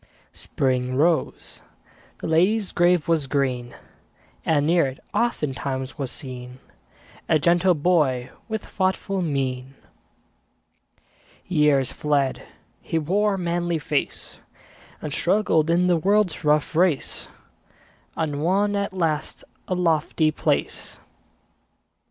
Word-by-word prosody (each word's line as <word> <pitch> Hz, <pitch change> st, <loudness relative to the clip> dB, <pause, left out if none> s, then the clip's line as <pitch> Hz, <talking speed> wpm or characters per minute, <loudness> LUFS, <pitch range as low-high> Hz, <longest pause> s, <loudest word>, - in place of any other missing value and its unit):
Spring 130 Hz, -1 st, -1 dB
rose; 160 Hz, +4 st, 0 dB, 0.6 s
the -, -, -5 dB
lady's 185 Hz, +6 st, +2 dB
grave 175 Hz, -2 st, +2 dB
was 160 Hz, -4 st, +1 dB
green; 130 Hz, -3 st, -1 dB, 0.7 s
And 145 Hz, -3 st, +2 dB
near 170 Hz, -2 st, +3 dB
it, 130 Hz, 0 st, -7 dB
oftentimes, 140 Hz, -, -2 dB
was 135 Hz, -2 st, -3 dB
seen 125 Hz, -2 st, -7 dB, 0.7 s
A 155 Hz, -, +5 dB
gentle 175 Hz, +4 st, +3 dB
boy 145 Hz, -6 st, +1 dB, 0.2 s
with 220 Hz, -1 st, -3 dB
thoughtful 190 Hz, 0 st, -1 dB
mien. 135 Hz, -4 st, -2 dB, 1.7 s
Years 150 Hz, -6 st, +2 dB
fled; 145 Hz, -3 st, 0 dB, 0.4 s
he 165 Hz, -, -2 dB
wore 195 Hz, +6 st, +1 dB
a -, -, -4 dB
manly 175 Hz, -1 st, -1 dB
face, 150 Hz, -1 st, -3 dB, 0.6 s
And 150 Hz, -2 st, -4 dB
struggled 170 Hz, -4 st, +2 dB
in 175 Hz, +2 st, +3 dB
the 180 Hz, -1 st, +3 dB
world's 200 Hz, +1 st, +1 dB
rough 150 Hz, +1 st, +2 dB
race, 170 Hz, -4 st, +1 dB, 0.9 s
And 150 Hz, -3 st, -2 dB
won 200 Hz, +5 st, +1 dB
at 200 Hz, -1 st, -2 dB
last 160 Hz, -5 st, -2 dB, 0.2 s
a 185 Hz, -, -1 dB
lofty 160 Hz, -2 st, +1 dB
place. -, -, -2 dB
160 Hz, 110 wpm, -23 LUFS, 140-180 Hz, 1.7 s, A